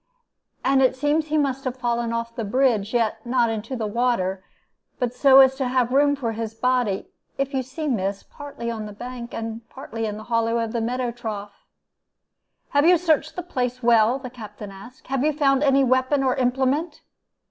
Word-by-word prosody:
And 270 0 +3
it 260 -1 +3
seemed 295 +4 +1
that 310 - -16
he 310 - +1
must 270 -2 0
have 255 -1 -3
fallen 235 -1 -1
off 230 0 -3
the 230 - -3
bridge, 220 -2 +1
yet 225 -2 0
not 240 -1 +1
into 225 +4 -4
the 230 -3 -3
water, 205 -4 0 0.5
but 245 -2 -1
so 270 +1 +7
as 265 0 +5
to 265 -2 -1
have 250 -1 +1
room 285 +2 +4
for 245 -5 -2
his 225 0 -5
body, 245 -4 0 0.3
if 275 +1 -2
you 265 - +1
see, 270 +5 -5
miss, 200 -6 -1
partly 280 -5 -7
on 215 -2 -5
the 210 - -9
bank, 245 +2 -7
and 225 0 -5
partly 225 -5 -5
in 210 0 -4
the 215 - -8
hollow 230 0 0
of 230 -1 -1
the 235 - -1
meadow 245 +1 -1
trough. 210 -4 -7 1.0
"'Have 285 +2 +3
you 360 0 +7
searched 320 -3 +1
the 360 - -4
place 250 -6 -3
well?' 230 +1 +4
the 255 -2 -8
Captain 210 -4 -9
asked. 200 +6 -13
'Have 270 0 -1
you 305 0 +2
found 275 -2 +2
any 275 -1 +4
weapon 260 +2 +2
or 255 -1 +2
implement?' 265 +5 0
250 Hz, 200 wpm, -23 LUFS, 225-270 Hz, 1.0 s, so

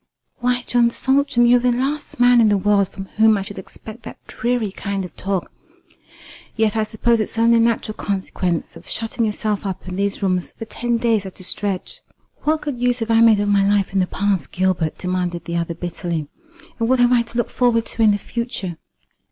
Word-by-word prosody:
"Why, 245 0 +1
John 240 -1 +3
Saltram, 265 0 +2
you 245 +1 +6
are - - +1
the 250 0 +2
last 270 +3 -2
man 245 0 +6
in 220 - +5
the 205 - +3
world 200 0 +2
from 195 - -8
whom 220 -1 +5
I 195 - -3
should 200 +1 -7
expect 220 +2 -11
that - - -9
dreary 240 -3 -1
kind 195 0 -4
of 180 - -12
talk. 195 -2 -3 1.0
Yet 220 -1 +1
I 220 - +2
suppose 225 +2 +1
it's 215 - -3
only 230 +1 +5
a - - +4
natural 230 -2 +1
consequence 185 -4 -2
of - - -13
shutting 225 0 -1
yourself 210 -1 -2
up 190 -2 -5
in 180 0 -5
these 200 +1 -1
rooms 185 -2 0
for 225 - -6
ten 240 +1 -1
days 225 -4 +1
at 190 - -9
a - - -8
stretch." 195 0 -1 0.4
"What 310 +1 +1
good 285 -5 -4
use 245 0 +1
have 230 -1 -2
I 225 0 +5
made 225 -2 +6
of 205 - 0
my 200 -1 +4
life 200 -2 +1
in 195 - +2
the 185 - +1
past, 195 -8 -1
Gilbert?" 185 -4 0
demanded 180 -1 -2
the 170 0 -2
other 170 0 -2
bitterly; 170 -2 -4 0.5
"and 230 0 0
what 260 - +4
have 245 0 +4
I 245 -1 +5
to 235 0 -6
look 240 - -1
forward 235 -2 +2
to 230 - -4
in 220 - +6
the 205 - +3
future? 205 -6 -4
215 Hz, 215 wpm, -20 LUFS, 190-235 Hz, 1.0 s, you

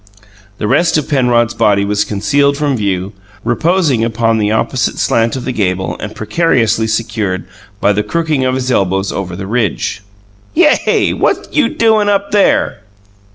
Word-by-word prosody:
The 105 - -2
rest 160 +7 +2
of 150 - -2
Penrod's 120 -5 +2
body 100 -3 +2
was 105 0 0
concealed 140 +8 +1
from 145 -2 0
view, 100 -2 -2 0.3
reposing 140 +1 +1
upon 115 0 0
the 105 -1 +1
opposite 115 +3 -1
slant 115 +1 +1
of 130 - -5
the 130 - -2
gable 95 -5 -1
and 105 - -7
precariously 115 -2 +1
secured 110 -5 -2 0.3
by 105 - +2
the 105 - 0
crooking 155 +4 -1
of 130 0 0
his 130 0 -2
elbows 95 -3 0
over 90 -2 -4
the 95 +1 -6
ridge. 105 -2 -2 0.5
"Yay! - - +3
What - - -1
you - - +2
doin' 220 -2 +2
up 200 0 0
there?" 200 - +2
115 Hz, 155 wpm, -14 LUFS, 105-140 Hz, 0.5 s, Yay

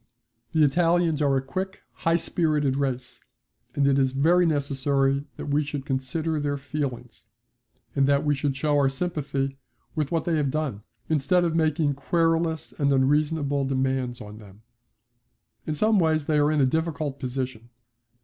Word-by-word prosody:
The 160 - +4
Italians 165 +1 +2
are 140 -2 +3
a 135 - -2
quick 185 +8 -5
high 165 0 0
spirited 155 -5 +1
race, 130 -3 -3 0.6
and 140 - +2
it 140 0 +3
is 130 -1 +1
very 170 +6 +4
necessary 140 -2 +1
that - - -7
we 145 +2 +2
should 145 -2 -5
consider 150 +4 -2
their 145 -1 -1
feelings, 130 -5 -5 0.7
and 135 -1 +3
that 140 +1 +2
we 145 - +3
should 135 -1 -1
show 145 +1 +1
our 135 -1 +3
sympathy 140 -3 -3 0.3
with 150 -3 -2
what 165 -2 0
they 165 -2 +1
have 145 -2 +1
done, 140 -8 -2 0.3
instead 160 +4 +2
of 165 -2 0
making 155 -2 +2
querulous 165 +2 0
and 140 -1 +2
unreasonable 145 +1 +2
demands 130 -2 -1
of 105 0 -10
them. 105 0 -15 1.0
In 155 - -1
some 215 +6 +3
ways 160 -3 +2
they 150 -1 +2
are 145 +1 +3
in 150 -2 +2
a - - +5
difficult 155 -1 -2
position. 125 -2 -4
145 Hz, 160 wpm, -25 LUFS, 135-160 Hz, 1.0 s, a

